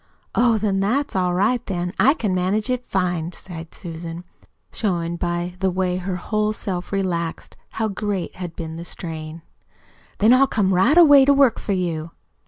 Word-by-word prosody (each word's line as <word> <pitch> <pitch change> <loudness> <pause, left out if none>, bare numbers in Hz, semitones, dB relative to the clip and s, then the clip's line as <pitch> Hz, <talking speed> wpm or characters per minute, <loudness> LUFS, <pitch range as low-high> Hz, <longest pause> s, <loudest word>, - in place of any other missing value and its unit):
"Oh! 235 -1 +3
Then 200 -2 0
that's 240 +8 0
all 180 -1 +1
right, 220 +6 +1
then. 180 -1 -3
I 275 +4 +5
can 210 -9 -1
manage 195 +6 0
it 250 -1 -2
fine," 180 -2 -1
sighed 165 -3 -10
Susan, 165 -1 -7 0.5
showing 170 -5 -1
by 175 +1 -2
the 190 - +1
way 185 0 -1
her 185 0 -3
whole 215 +3 -1
self 185 -5 -4
relaxed 175 -4 -2 0.2
how 225 - -1
great 200 -2 -3
had 175 -3 -6
been 160 -1 -6
the 170 - -6
strain. 160 -2 -6 0.7
"Then 220 +4 +5
I'll 270 +2 +5
come 195 -6 +1
right 235 - +4
away 290 -5 +8
to 280 - +5
work 275 -5 +4
for 200 - -2
you." 170 -4 -2
185 Hz, 175 wpm, -22 LUFS, 175-215 Hz, 0.7 s, away